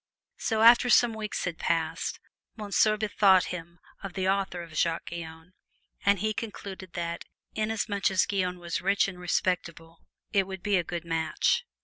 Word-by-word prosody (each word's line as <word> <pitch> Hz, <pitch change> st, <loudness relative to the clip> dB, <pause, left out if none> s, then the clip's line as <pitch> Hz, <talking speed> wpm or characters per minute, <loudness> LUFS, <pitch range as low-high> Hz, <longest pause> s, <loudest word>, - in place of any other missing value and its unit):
So, 220 Hz, -2 st, 0 dB
after 240 Hz, +2 st, +7 dB
some 240 Hz, -1 st, +5 dB
weeks 215 Hz, -1 st, -4 dB
had 175 Hz, -2 st, -4 dB
passed, 165 Hz, -1 st, -1 dB, 0.4 s
Monsieur 215 Hz, 0 st, +2 dB
bethought 205 Hz, -3 st, +4 dB
him 170 Hz, -1 st, -8 dB, 0.2 s
of 195 Hz, -2 st, -7 dB
the 190 Hz, 0 st, -2 dB
offer 190 Hz, -2 st, 0 dB
of 165 Hz, -2 st, -12 dB
Jacques 165 Hz, +1 st, 0 dB
Guyon, 165 Hz, +1 st, -8 dB, 0.5 s
and 200 Hz, 0 st, +4 dB
he 215 Hz, +3 st, -1 dB
concluded 200 Hz, -3 st, -7 dB
that 170 Hz, -1 st, -4 dB, 0.3 s
inasmuch 215 Hz, -2 st, 0 dB
as 190 Hz, -2 st, +2 dB
Guyon 185 Hz, -3 st, -1 dB
was 170 Hz, -1 st, -4 dB
rich 195 Hz, +2 st, +2 dB
and 185 Hz, -2 st, -8 dB
respectable 170 Hz, -2 st, -2 dB, 0.3 s
it 195 Hz, -2 st, +2 dB
would 190 Hz, -1 st, -7 dB
be 205 Hz, -2 st, +2 dB
a 175 Hz, -, +1 dB
good 170 Hz, 0 st, -5 dB
match. 165 Hz, -1 st, 0 dB
190 Hz, 160 wpm, -28 LUFS, 170-205 Hz, 0.5 s, after